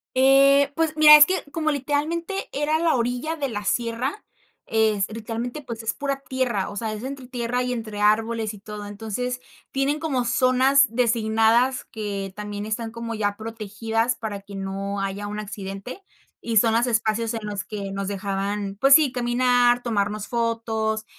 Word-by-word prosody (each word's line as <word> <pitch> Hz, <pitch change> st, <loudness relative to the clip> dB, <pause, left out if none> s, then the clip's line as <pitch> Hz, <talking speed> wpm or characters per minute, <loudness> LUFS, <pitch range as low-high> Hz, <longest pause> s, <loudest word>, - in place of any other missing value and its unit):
Eh, 275 Hz, +2 st, +5 dB
pues, 325 Hz, -1 st, 0 dB
mira, 305 Hz, 0 st, +10 dB
es 300 Hz, 0 st, +9 dB
que 375 Hz, +4 st, -1 dB
como, 315 Hz, -2 st, 0 dB
literalmente, 305 Hz, +7 st, -2 dB
era 295 Hz, +2 st, 0 dB
la 330 Hz, -2 st, +2 dB
orilla 245 Hz, +6 st, -1 dB
de 280 Hz, -, -1 dB
la 205 Hz, -2 st, -4 dB
sierra, 235 Hz, -, -2 dB, 0.4 s
es 220 Hz, -3 st, +2 dB
literalmente, 230 Hz, +5 st, -5 dB
pues, 235 Hz, -4 st, -7 dB
es 225 Hz, -, -1 dB
pura 275 Hz, -1 st, -3 dB
tierra, 250 Hz, -7 st, -1 dB
o -, -, -9 dB
sea, 220 Hz, +1 st, -3 dB
es 215 Hz, +2 st, -7 dB
entre 265 Hz, -1 st, -6 dB
tierra 245 Hz, 0 st, -2 dB
y 250 Hz, -, -2 dB
entre 215 Hz, -3 st, -5 dB
árboles 220 Hz, +1 st, +1 dB
y 210 Hz, -, -11 dB
todo, 210 Hz, 0 st, -8 dB
entonces, 225 Hz, +4 st, -4 dB, 0.3 s
tienen 275 Hz, +3 st, 0 dB
como 270 Hz, -6 st, -1 dB
zonas 255 Hz, +2 st, +4 dB
designadas 230 Hz, +2 st, +2 dB
que 200 Hz, -3 st, -5 dB
también 210 Hz, 0 st, -5 dB
están 225 Hz, +1 st, -3 dB
como 230 Hz, 0 st, -5 dB
ya 205 Hz, -1 st, -1 dB
protegidas 225 Hz, +2 st, -2 dB
para 210 Hz, -3 st, -5 dB
que 200 Hz, 0 st, -11 dB
no 195 Hz, +1 st, -4 dB
haya 195 Hz, +1 st, -3 dB
un 210 Hz, +1 st, -5 dB
accidente 200 Hz, -, -7 dB, 0.4 s
y 230 Hz, -1 st, -1 dB
son 225 Hz, +1 st, +4 dB
los 235 Hz, +2 st, +2 dB
espacios 225 Hz, 0 st, 0 dB
en 225 Hz, -2 st, -5 dB
los 205 Hz, -2 st, -4 dB
que 200 Hz, -2 st, -6 dB
nos 195 Hz, 0 st, -3 dB
dejaban, 200 Hz, 0 st, -3 dB
pues, 275 Hz, 0 st, +8 dB
sí, 295 Hz, -5 st, +4 dB
caminar, 245 Hz, 0 st, +2 dB
tomarnos 210 Hz, -3 st, -1 dB
fotos, 225 Hz, -2 st, -1 dB
230 Hz, 170 wpm, -24 LUFS, 210-260 Hz, 0.4 s, mira